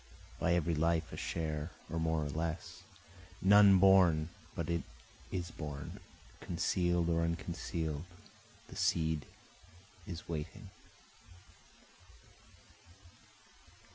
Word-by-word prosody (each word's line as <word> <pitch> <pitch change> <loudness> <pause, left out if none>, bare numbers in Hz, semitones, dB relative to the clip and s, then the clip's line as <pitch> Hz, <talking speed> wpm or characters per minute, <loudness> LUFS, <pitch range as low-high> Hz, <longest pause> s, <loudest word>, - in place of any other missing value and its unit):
By 90 -1 +3
every 85 -1 +1
life 80 0 +1
a - - -3
share 80 -1 -3 0.2
or 80 - -3
more 80 -1 0
or - - -3
less, 85 +3 -4 0.6
None 100 0 +7
born 90 -5 +5 0.3
but - - -2
it 85 -1 0 0.5
is 85 -2 -3
born, 75 -3 -6 0.4
conceal'd 85 0 +1
or 85 -1 +2
unconceal'd 85 -2 -2 0.6
the - - -11
seed 80 -2 +1 0.8
is 85 -2 -7
waiting. 75 -3 -6
85 Hz, 95 wpm, -34 LUFS, 80-85 Hz, 0.8 s, None